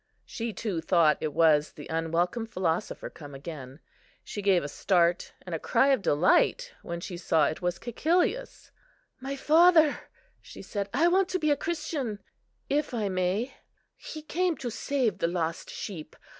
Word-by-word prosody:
She 230 0 -4
too 200 -6 -3
thought 165 -2 +3
it 155 - -1
was 155 -1 +3
the 145 - -10
unwelcome 170 +7 -1
philosopher 180 -6 -2
come 145 -3 -11
again; 140 -2 -8 0.4
she 205 - -6
gave 195 -3 +3
a - - -3
start 175 +3 +1
and 180 - -6
a 165 - -1
cry 270 - +2
of 265 -5 +3
delight 340 - +2
when 170 0 -5
she 175 0 -6
saw 160 -3 +2
it 155 - -3
was 175 0 -1
Cæcilius. 345 - -1 0.5
"My 270 +2 -4
father," 320 +1 +5 0.4
she - - -11
said, 200 -1 -4
"I 300 +8 +3
want 375 +1 +3
to 370 - 0
be 310 -4 +1
a - - +4
Christian, 300 -8 -3 0.5
if 285 -3 -1
I 210 -3 -1
may; 185 +7 -1 0.4
He 310 -1 -9
came 345 +2 0
to 245 -3 -4
save 235 -6 -1
the - - +1
lost 165 -1 -3
sheep. 160 -6 -7
200 Hz, 165 wpm, -28 LUFS, -, 0.5 s, father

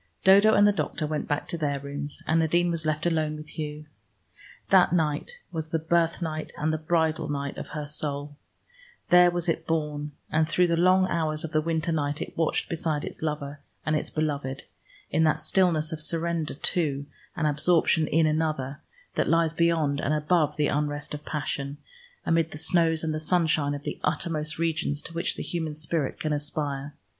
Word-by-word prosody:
Dodo 200 +3 +7
and 205 0 +6
the - - +5
doctor 180 -5 -2
went 150 0 -2
back 145 - -1
to 170 - -3
their 145 -2 0
rooms, 145 +1 -4
and 160 +1 +2
Nadine 170 +2 +2
was 160 -2 -2
left 155 +1 0
alone 155 -3 +1
with 150 0 -10
Hugh. 150 -1 -5 0.9
That - - +6
night 165 - -1
was 160 -2 -4
the 165 - +1
birthnight 160 -1 0
and 155 +1 0
the 155 - -1
bridal 160 -1 0
night 140 -1 -3
of - - -6
her 150 - -3
soul: 145 -1 -3 0.7
there 180 0 +7
was 175 0 -2
it 165 -1 -1
born, 150 -2 -2 0.2
and 155 0 +2
through 180 +1 +4
the 170 -1 +2
long 185 +2 +4
hours 155 -3 -1
of 165 - -5
the 155 - +2
winter 165 +1 -1
night 145 -2 -1
it - - -6
watched 165 -1 0
beside 160 -3 -2
its - - -8
lover 150 -2 -3 0.3
and 155 - +1
its 150 - -1
beloved, 145 -3 -2 0.5
in 160 - +3
that 155 - +2
stillness 165 -5 +2
of 155 - -1
surrender 165 -1 -1
to 145 -3 0 0.3
and 155 - -1
absorption 155 +1 +3
in 160 +1 +3
another, 155 -3 -1 0.3
that - - 0
lies 165 -1 +3
beyond 165 -4 +2
and 150 - +1
above 150 -1 +1
the 150 - +2
unrest 145 0 -1
of 150 0 -6
passion 140 -1 -3 0.5
amid 165 -1 +2
the 150 - -8
snows 165 0 +2
and 155 -1 -2
sunshine 155 -4 +2
of 145 - -7
the - - -4
uttermost 155 -3 -1
regions 160 -3 0
to 165 - -8
which 170 +2 -1
the - - -4
human 160 -3 -3
spirit 155 -2 -2
can 155 -1 -1
aspire. 145 -1 -3
155 Hz, 185 wpm, -27 LUFS, 150-165 Hz, 0.9 s, Dodo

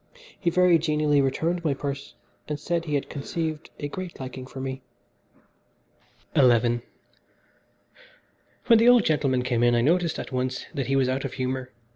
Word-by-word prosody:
He 175 - +1
very 180 -1 +4
genially 150 -2 +2
returned 165 +6 -1
my 150 -4 +1
purse, 140 0 -5 0.3
and 150 -1 -3
said 170 +2 -2
he 150 -2 -1
had 140 - -1
conceived 155 +2 -4
a 145 - -3
great 180 +4 -7
liking 130 0 -7
for 130 - -9
me. 130 0 -4 1.5
XI - - +5 2.2
When 230 -3 +6
the 235 +2 +6
old 245 -3 +6
gentleman 135 -5 +1
came 125 -2 0
in 120 0 +4
I 120 - +3
noticed 170 +4 +2
at - - -6
once 130 0 -2
that 135 - -3
he 135 - +1
was 135 -2 +3
out 130 +1 -1
of - - -4
humour. 130 -1 -3
145 Hz, 165 wpm, -25 LUFS, 130-165 Hz, 2.2 s, When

